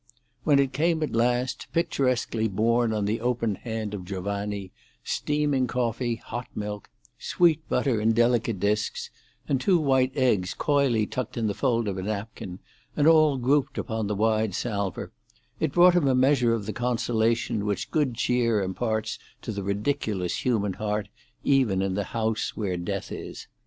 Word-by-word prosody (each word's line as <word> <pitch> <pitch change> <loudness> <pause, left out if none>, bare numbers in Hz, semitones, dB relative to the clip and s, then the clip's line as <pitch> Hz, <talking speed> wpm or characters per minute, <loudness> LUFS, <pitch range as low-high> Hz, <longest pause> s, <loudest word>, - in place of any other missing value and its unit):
When 145 -3 +5
it 135 -1 +2
came 160 +3 +1
at 155 - -3
last, 120 +2 0
picturesquely 130 -8 +1
borne 115 +3 +2
on 105 -2 0
the 110 +2 -1
open 120 -3 0
hand 110 0 -5
of 100 -3 -5
Giovanni, 100 +1 -4 0.3
steaming 145 -3 0
coffee, 120 -1 -1
hot 120 +2 -6
milk, 105 -1 -5 0.3
sweet 160 -3 +2
butter 120 -6 +1
in 110 +1 +3
delicate 115 -2 +2
disks, 105 +2 -1 0.4
and 135 -2 +1
two 185 +5 +4
white 135 -4 +2
eggs 110 -9 +1
coyly 140 -7 +2
tucked 125 +2 -4
in 115 - 0
the 105 - 0
fold 115 -2 0
of 95 -2 -2
a - - -2
napkin, 100 -2 -5 0.4
and 145 - +3
all 155 -3 +5
grouped 135 +2 +1
upon 110 -3 -2
the 105 - -1
wide 110 -1 +1
salver, 100 -6 -3 0.5
it - - 0
brought 175 +3 +6
him 175 -5 +3
a 130 - +3
measure 130 -3 +3
of 105 -3 -5
the 110 - -4
consolation 115 -3 0
which 100 -3 -2
good 145 -6 +1
cheer 115 -2 +1
imparts 110 +3 -2 0.2
to - - -4
the 100 -2 -4
ridiculous 100 -2 -1
human 105 -6 +1
heart 105 0 -2 0.3
even 120 -9 +3
in 95 -1 -1
the 100 +1 -1
house 110 +1 -2
where 100 -4 -1
death 85 0 -4
is. - - -7
115 Hz, 165 wpm, -26 LUFS, 105-130 Hz, 0.5 s, brought